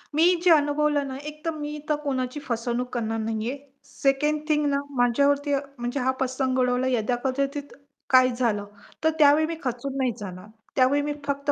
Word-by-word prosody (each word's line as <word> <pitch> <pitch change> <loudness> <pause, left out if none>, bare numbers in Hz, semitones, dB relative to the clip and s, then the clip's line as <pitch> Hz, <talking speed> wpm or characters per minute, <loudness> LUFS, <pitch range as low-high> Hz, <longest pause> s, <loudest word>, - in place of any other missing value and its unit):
मी 315 - +4 0.2
जे 360 - +5
अनुभवलं 295 -1 +3
ना 265 - -5
एक 305 0 -14
तर 330 - +1
मी 300 0 -5
तर 300 - +3
कोणाची 260 -1 -2
फसवणूक 240 0 -2
करणार 225 -2 -1
नाहीये, 225 +4 -2 0.3
सेकंड 285 +2 0
थिंग 300 -1 +2
ना 280 - +1 0.2
माझ्यावरती 280 +4 +2
म्हणजे 275 -2 -4
हा 260 0 +2
प्रसंग 260 0 0
उडवला 250 0 +2
यदा 245 -2 +1
कदाचित 275 +2 -2 0.4
काय 255 -1 +6
झालं, 225 -5 0 0.4
तर 320 - +5
त्यावेळी 295 +1 +6
मी 330 - -3
खचून 255 +1 -3
नाही 260 -3 +1
जाणार. 185 -1 -8 0.3
त्यावेळी 270 +2 +4
मी 295 0 -2
फक्त 280 +1 -1
270 Hz, 170 wpm, -25 LUFS, 245-290 Hz, 0.4 s, काय